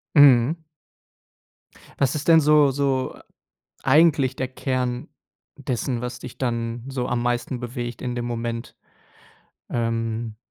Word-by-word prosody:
Mhm. 145 +3 +6 1.3
Was 140 +1 +1
ist 150 - -4
denn 165 -1 +8
so 150 -2 +5
so 135 -1 -1 0.7
eigentlich 145 -2 +4
der 130 - -2
Kern 125 -1 -2 0.5
dessen, 125 0 -2
was 125 0 -5
dich 125 -1 -9
dann 115 -1 -2
so 130 -2 -2
am 120 -1 -1
meisten 120 +1 -1
bewegt 120 -1 -5
in 125 -1 -3
dem 120 - -3
Moment? 115 -1 -4 1.0
Ähm, 115 -1 -2
125 Hz, 120 wpm, -23 LUFS, 120-135 Hz, 1.3 s, denn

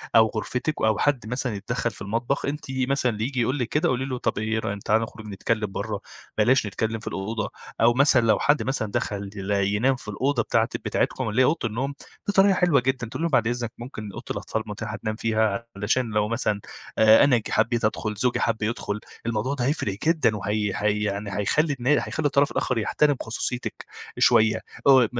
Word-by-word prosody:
أو 110 -1 +7
غرفتِك 125 +6 -1
أو 110 -1 +3
حد 135 -6 +1
مثلًا 125 -1 -1
يتدخل 115 +4 -2
في 100 - -13
المطبخ. 115 +7 -1
أنتِ 145 +1 -3
مثلًا 130 -1 +1
اللي 110 -1 -4
ييجي 130 +1 -1
يقول 130 +5 0
لِك 125 - 0
كده، 150 - +1
قولي 130 +1 0
له 130 -2 -3
طب - - -1
إيه 110 +1 0
رأي 100 -2 -3
تعالَ 110 +1 +3
نخرج 110 -1 -7
نتكلم 105 +1 -2
برا، 105 +1 -3 0.4
بلاش 120 +3 +4
نتكلم 110 +3 -2
في 110 - -12
الأوضة. 110 +4 -3 0.3
أو 115 +1 +6
مثلًا 135 -1 +5
لو 110 -3 +3
حد 145 +1 +3
مثلًا 130 -6 -2
دخل 100 -1 -2
ي 100 0 0
ينام 130 +6 +2
في 125 - -11
الأوضة 125 +4 0
بتاعة - - +1 0.2
بتاعتكم - - 0
اللي 110 +5 +2
هي - - +6
أوضة 150 -4 +1
النوم، 130 +6 -3 0.3
دي 205 - +1
طريقة 195 0 +5
حلوة 180 -6 +3
جدًا 130 -1 -1
تقولي 160 - -4
لهم، 170 - +1
بعد 120 -5 +3
إذنك 120 -1 -2
ممكن 110 -4 -7
أوضة - - -8
الأطفال - - -3
متاحة - - -5
تنام 110 0 -3
فيها 110 0 0
علشان 115 +5 0
لو 105 -1 +1
مثلًا 110 -2 -1 0.4
آآ، 110 0 +7
أنا 135 -4 +5
ج 110 - -5
حبيت 115 0 +2
أدخل، 110 0 -1
زوجي 120 +4 0
حب 115 -2 0
يدخل، 105 -1 -2 0.3
الموضوع 115 +3 -1
ده 125 -4 -1
هيفرق 125 -9 -1
جدًا 155 -9 +3
وهَي 105 0 -1
هَي 105 0 0
يعني 100 0 -3
هيخلي 150 +9 +2
النا 125 +2 -1 0.2
هيخلي 160 - -3
الطرف 140 +1 +2
الآخر 125 - -1
يحترم 145 +6 +2
خصوصيتِك 120 +2 -4 0.3
شوية. 110 -2 +4 0.3
آآ، 130 -5 +7
م 120 - -2
115 Hz, 205 wpm, -25 LUFS, 105-130 Hz, 0.4 s, أو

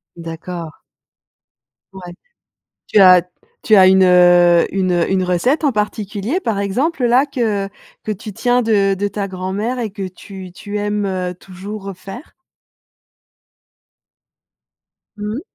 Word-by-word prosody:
D'accord. 165 0 -8 1.1
Ouais. 180 -2 -10 0.7
Tu 210 - +3
as 185 -2 +8 0.4
tu 220 - +4
as 190 -2 +7
une, 190 0 +5
heu, 175 -1 +5
une 190 -2 0 0.2
une 190 -1 +1
recette 185 - 0
en 285 - +3
particulier, 210 - -2
par 225 - -2
exemple, 255 - -1
là, 245 +3 +4
que 220 -8 -2 0.4
que 215 - -3
tu 210 +1 -7
tiens 245 +2 +1
de 200 -4 +2
de 205 +2 -1
ta 200 0 -4
grand-mère 195 +6 -4
et 225 - -2
que 195 -1 -5
tu 185 0 -11
tu 205 +4 -7
aimes 200 -3 -2
toujours 195 +2 -9
refaire? 195 - -9 2.8
Mmh 210 +2 -4
mh. 275 - -5
195 Hz, 125 wpm, -18 LUFS, 185-215 Hz, 2.8 s, as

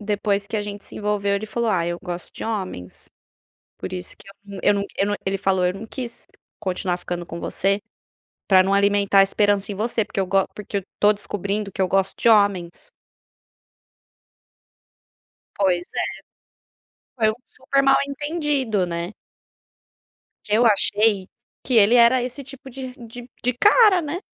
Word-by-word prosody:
depois 205 -1 -1
que 220 - -3
a 210 - -1
gente 205 -1 -7
se - - -10
envolveu 205 -1 0
ele 200 +2 -2
falou: 235 +2 -2
"Ah 170 -4 +1
eu 175 0 -3
gosto 175 0 -6
de - - -8
homens", 190 - -5 0.7
por - - -6
isso 180 -1 -6
que - - -16 0.3
eu - - +4
não 200 0 -1
eu 195 - +1
não 205 - 0
ele 195 +1 0
falou: 190 -2 +1
"Eu 180 - 0
não 205 +3 -8
quis 240 0 -7 0.3
continuar 180 -1 -1
ficando 175 -1 -5
com 170 0 -7
você, 195 +2 0 0.7
pra 190 -2 +7
não 195 +1 +1
alimentar 200 0 +4
a - - +9
esperança 205 0 +1
em - - -3
você. 220 +2 -1
Porque - - -8
eu 190 - 0
go 195 +1 +2
porque 205 -1 -4
eu - - -6 0.2
tô 205 0 +6
descobrindo 205 0 -4
que 195 - -7
eu 190 - +3
gosto 195 +1 0
de - - +3
homens". 200 -6 +2 2.7
Pois 180 -3 +1
é, - - 0 1.1
foi 220 -3 +3
um - - -5
super 275 +1 0
mal 275 0 +5
entendido 280 - -1
né. 170 +2 -4 1.3
Que 210 - -4
eu 240 - +4
achei, 205 -2 +3 0.4
que 255 - 0
ele 220 +2 +6
era 240 +2 +6
esse 255 +3 -5
tipo 270 0 -11
de 260 0 -7
de 240 0 -10
de 250 +1 +1
cara, 410 - +5
né. 315 +3 -4
205 Hz, 170 wpm, -22 LUFS, 195-235 Hz, 2.7 s, a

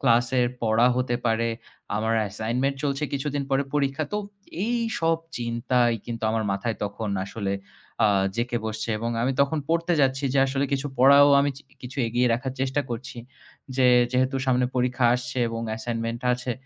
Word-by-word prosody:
ক্লাসের 120 0 +3 0.2
পড়া 115 +1 +4
হতে 125 -1 0
পারে, 115 0 +1 0.5
আমার 110 +2 0
assignment 120 +7 -1
চলছে 140 0 -1
কিছুদিন 140 0 -2
পরে 135 +1 +2
পরীক্ষা। 140 +1 0
তো 210 - 0 0.5
এই 240 +1 +1 0.2
সব 165 0 +3 0.2
চিন্তাই 120 0 +1
কিন্তু 115 -1 -5
আমার 110 -1 0
মাথায় 110 +4 -2
তখন 105 +2 -4 0.2
আসলে 100 -1 -3 0.5
আ - - +5 0.3
জেকে 120 0 -1
বসছে 110 +1 -4
এবং 115 +2 -2
আমি 130 +3 +1
তখন 140 +3 +2
পড়তে 170 +1 +1
যাচ্ছি 135 0 +1
যে - - +3
আসলে 135 +1 0
কিছু 140 +1 0
পড়াও 140 +2 +7
আমি 145 0 +1
চি 140 - -12 0.2
কিছু 130 +3 -8
এগিয়ে 120 +2 +1
রাখার 130 +2 -3
চেষ্টা 135 +2 0
করছি। 125 +2 -6 0.6
যে 130 -2 +4 0.3
যেহেতু 130 +1 +1
সামনে 125 -1 +3
পরীক্ষা 125 0 +1
আসছে 125 +1 -4
এবং 115 0 -4 0.2
assignment 115 0 -3
আছে 125 0 -2
125 Hz, 165 wpm, -25 LUFS, 115-135 Hz, 0.6 s, পড়াও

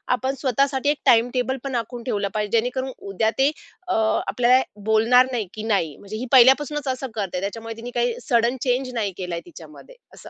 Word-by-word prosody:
आपण 260 +2 -3
स्वतःसाठी 275 +1 +1
एक 295 - +1
टाईमटेबल 245 +2 +3
पण 275 -2 -4
आखून 235 +1 -4
ठेवलं 205 -4 -1
पाहिजे, 210 +1 0
जेणेकरून 260 +3 -2
उद्या 200 +3 -1
ते 275 +2 +3 0.4
अ, - - 0 0.3
आपल्याला 245 +5 +3 0.2
बोलणार 225 +4 +4
नाही 230 -6 -2
की 215 - -7
नाही 195 -9 0
म्हणजे 205 +2 -8
ही 245 - -4
पहिल्यापासूनच 275 +3 +5
असं 260 0 -2
करते. 195 -4 -3
त्याच्यामुळे 225 +3 -5
तिने 240 +2 -7
काही 240 -1 +1
सडन 235 +1 +2
चेंज 255 0 -1
नाही 215 -4 -1
केलाय 180 -2 -4
तिच्यामध्ये, - - -14 0.2
असं. - - -13
240 Hz, 180 wpm, -23 LUFS, 220-260 Hz, 0.4 s, पहिल्यापासूनच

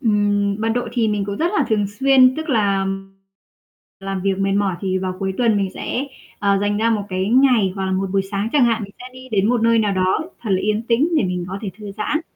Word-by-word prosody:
Ừm, 205 -3 +1
mật 225 - 0
độ 245 -1 -2
thì 235 -3 +1
mình 205 -1 -1
cũng 200 0 -4
rất 340 - 0
là - - +3
thường 210 -3 +1
xuyên, 260 +5 +4
tức 315 +1 -5
là 200 -6 +1 1.1
làm 195 -1 -4
việc 195 -1 0
mệt 195 0 0
mỏi 200 -2 +1
thì 190 -1 -1
vào 185 -1 -3
cuối 190 0 -2
tuần 230 -4 +3
mình 195 -2 0
sẽ, 260 - -3 0.3
ờ, 200 -1 +2
dành 205 0 0
ra 225 +2 +1
một 215 -2 0
cái 185 +1 -2
ngày 240 -6 +4
hoặc 195 -1 -3
là 190 - -1
một 190 +1 0
buổi 195 -1 +2
sáng 200 +2 -1
chẳng 285 -4 +4
hạn, 230 -2 +1
mình 200 - -12
sẽ - - -10
đi 255 0 -12
đến 205 -1 +2
một 245 -1 +2
nơi 230 0 +4
nào 210 -2 +1
đó 185 - 0
thật 220 - -5
là 185 - +2
yên 210 +2 0
tĩnh 240 +7 +2
để 300 - +3
mình 180 -1 -2
có 190 +2 -5
thể 200 - -3
thư 205 -2 -8
giãn. 295 +9 -1
205 Hz, 255 wpm, -20 LUFS, 195-235 Hz, 1.1 s, xuyên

